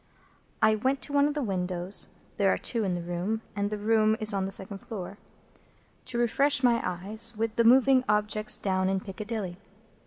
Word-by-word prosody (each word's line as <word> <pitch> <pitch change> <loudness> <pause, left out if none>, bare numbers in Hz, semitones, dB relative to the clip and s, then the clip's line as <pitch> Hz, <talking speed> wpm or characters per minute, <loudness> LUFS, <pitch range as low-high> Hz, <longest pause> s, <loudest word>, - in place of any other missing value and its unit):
I 220 0 +5
went 260 +6 0
to 290 - -5
one 285 0 +4
of 295 - -3
the 295 - -1
windows 180 -2 0 0.3
(there 195 -1 +3
are - - +1
two 230 -3 -2
in 185 -3 -1
the 175 - -5
room, 180 +6 -3
and 205 0 -1
the 210 - -4
room 215 +1 +2
is 215 0 +3
on 195 -1 -1
the 195 - -5
second 195 0 -2
floor) 200 -2 -8 0.9
to 250 -1 -5
refresh 275 +4 +2
my 235 -2 +3
eyes 215 +6 +1
with 225 0 -2
the 235 - +3
moving 260 +2 +5
objects 210 0 +1
down 190 -1 0
in 195 0 0
Piccadilly. 200 -1 -6
215 Hz, 190 wpm, -27 LUFS, 195-235 Hz, 0.9 s, I